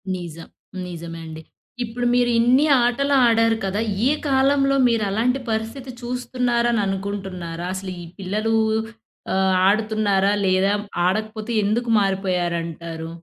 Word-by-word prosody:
నిజం. 170 -2 -8 0.4
నిజమే 170 -1 -7
అండి. 160 0 -8 0.4
ఇప్పుడు 240 +1 -4
మీరు 245 0 +3
ఇన్ని 250 +5 +4 0.2
ఆటలు 280 +4 +1
ఆడారు 230 -1 +3
కదా! 195 +3 -1 0.2
ఈ - - +4 0.2
కాలంలో 275 0 +3
మీరు 230 -2 +1
అలాంటి 240 +6 +1
పరిస్థితి 225 +4 -4
చూస్తున్నారని 240 -2 0
అనుకుంటున్నారా? 190 -3 -4
అసలీ 190 -1 -5 0.2
పిల్లలు 215 +4 -1 0.8
ఆహ్, 190 0 +2
ఆడుతున్నారా? 205 -2 +2
లేదా 190 +1 +2 0.3
ఆడకపోతే 215 +3 -2
ఎందుకు 230 +4 0
మారిపోయారంటారు? 170 -4 -2
210 Hz, 110 wpm, -22 LUFS, 185-240 Hz, 0.8 s, ఇన్ని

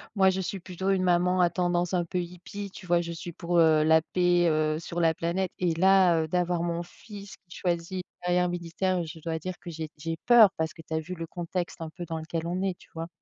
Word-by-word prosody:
moi, 190 -1 +5
je 190 - -1
suis 190 +1 -3
plutôt 185 +1 -4
une 190 -1 +2
maman 180 +1 +3
à 175 - +5
tendance 175 0 0
un 175 -1 +1
peu 180 - -4
hippie, 180 +3 -7
tu 185 - -11
vois? 175 0 +3
Je 170 0 -5
suis 170 +1 -7
pour, 170 +1 0
heu, 155 -2 +5
la 160 +1 +5
paix, 175 -1 +3
heu, 155 0 +1
sur 170 +1 -4
la 165 -1 +4
planète, 170 +3 -2
et 175 -2 +1
là, 185 -1 +5
heu, - - -4
d'avoir 175 0 0
mon 170 0 -2
fils 200 +2 -11
qui - - -10
choisit 175 0 -2
une - - -73
carrière 180 0 +2
militaire, 175 +2 -1
oui, 170 - -3
je 160 +1 -9
dois 160 0 -3
dire 185 +2 -4
que 175 - -9
j'ai 160 -1 -5
j'ai 165 +2 -3
peur 235 -4 +8
parce 160 0 -1
que 165 - -12
tu 160 - -8
as 160 - +1
vu 180 +4 -6
le 165 0 -6
contexte 175 0 -4
un 160 - -4
peu 175 +2 -8
dans 165 -1 -4
lequel 160 +1 -4
on 180 +2 -2
est, 190 -2 -1
tu - - -20
vois? 165 0 -4
175 Hz, 260 wpm, -27 LUFS, 165-185 Hz, -, peur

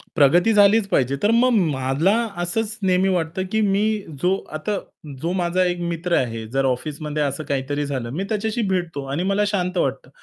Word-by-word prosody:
प्रगती 170 +7 +4
झालीच 205 0 +5
पाहिजे. 135 -7 +1
तर 210 - +4
मग 240 +2 +4 0.2
मला 135 +6 +1 0.3
असंच 220 +5 -2
नेहमी 185 0 +3
वाटतं 175 0 -1
की 220 - +1
मी 195 +1 +2 0.4
जो 185 +2 +3 0.2
आता 205 +6 -2 0.4
जो 170 - -1
माझा 180 0 +1
एक 175 0 -1
मित्र 170 +1 -1
आहे, 115 -3 -1
जर 135 +4 0
ऑफिसमध्ये 150 +3 -2
असं 140 +2 -2
काहीतरी 145 +1 -2
झालं, 130 -4 -3
मी 155 +10 -3
त्याच्याशी 220 +2 -1
भेटतो 175 -6 -2
आणि 155 +6 -1
मला 200 +2 +1
शांत 185 -3 -1
वाटतं. - - -1
175 Hz, 175 wpm, -22 LUFS, 145-195 Hz, 0.4 s, झालीच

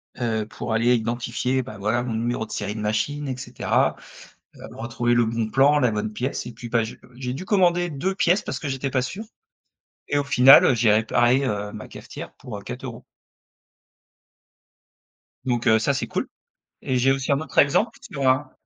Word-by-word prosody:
heu, 110 -3 -2
pour 110 - -5
aller 120 +2 +3
identifier, 120 +3 -1
bah, 125 -4 -9
voilà, 110 +5 0
mon 120 -3 -3
numéro 115 0 -2
de - - -15
série 105 0 -3
de - - -5
machine 140 +8 -1
et 130 -1 -3
cetera. - - 0 0.6
Heu, - - -15
retrouver 120 +1 -1
le 120 -1 +3
bon 110 -1 -2
plan, 140 +4 +4
la 125 -4 +2
bonne 105 0 -2
pièce 125 +2 -3
et 120 - -7
puis 120 +1 -9
bah 115 -1 +2
j'ai, 110 - -7
heu - - -19
j'ai 125 -1 -4
dû 180 +8 -6
commander 175 -3 +2
2 170 +6 -2
pièces. 185 +1 +2
Parce - - -5
que 150 - -5
j'étais 135 0 -2
pas 130 -1 0
sûr 190 - -5 0.8
et 145 - 0
au 145 - +1
final, 135 -1 +7
heu, - - +4
j'ai 110 -2 +3
réparé, 120 +5 +3
heu, 105 -3 -2
ma - - -8
cafetière - - -10
pour, 110 -4 -8
heu, - - -9
4 125 +4 -7
euros. 115 -2 -8 2.4
Donc, 120 -1 -1
heu, 110 - +6
ça 110 - +1
c'est - - -2
cool. - - -3 0.5
Et 130 - -1
j'ai 130 +2 +3
aussi 135 +1 -1
un 140 - +2
autre 140 -4 -10
exemple 145 +11 +3
sur 150 - -3
un 130 +1 +2
125 Hz, 205 wpm, -23 LUFS, 115-135 Hz, 2.4 s, final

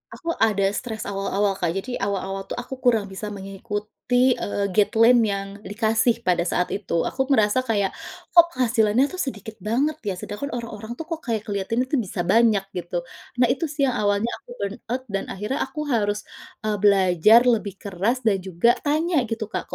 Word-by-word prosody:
Aku 335 -1 -3
ada 205 -3 +3
stres 220 0 -4
awal-awal 195 0 -1
Kak, 175 - +1
jadi 245 +6 -4
awal-awal 195 -1 -3
tuh - - -4
aku 250 +2 -6
kurang 225 -6 +2
bisa 200 +2 -6
mengikuti, 210 +5 -1
eee, 200 -1 -2
guideline 225 +4 +5
yang 200 -3 0 0.2
dikasih 225 +3 +1
pada 175 -1 +1
saat 180 - 0
itu. 175 -4 -1
Aku 265 0 -1
merasa 220 -3 +3
kayak 210 -6 0 0.4
kok 340 -1 +7
penghasilannya 235 -1 +3
tuh 370 - -7
sedikit 220 - -5
banget 270 +10 0
ya 190 - -1
sedangkan 210 +10 -5
orang-orang 230 -1 -6
tuh 325 - -6
kok 325 - -2
kayak 220 -2 -1
kelihatan 205 +4 -1
itu 260 0 0
bisa 185 -4 -3
banyak 215 +1 +4
gitu. 175 -1 -4 0.3
Nah, 245 0 +3
itu 320 +5 -1
sih 290 -1 -2
yang 255 -4 +1
awalnya 205 +3 +1
aku - - -26
burnout 215 +5 -4
dan 195 - -1
akhirnya 210 +7 -3
aku 300 +3 -8
harus, 210 -2 0 0.4
eee, 210 -1 0
belajar 200 +3 +5
lebih 215 -5 +1
keras 205 +7 -2
dan 200 -4 +2
juga 190 +7 +2
tanya 310 +2 +1
gitu, 225 0 -3
Kak, - - -3
215 Hz, 175 wpm, -23 LUFS, 195-245 Hz, 0.4 s, kok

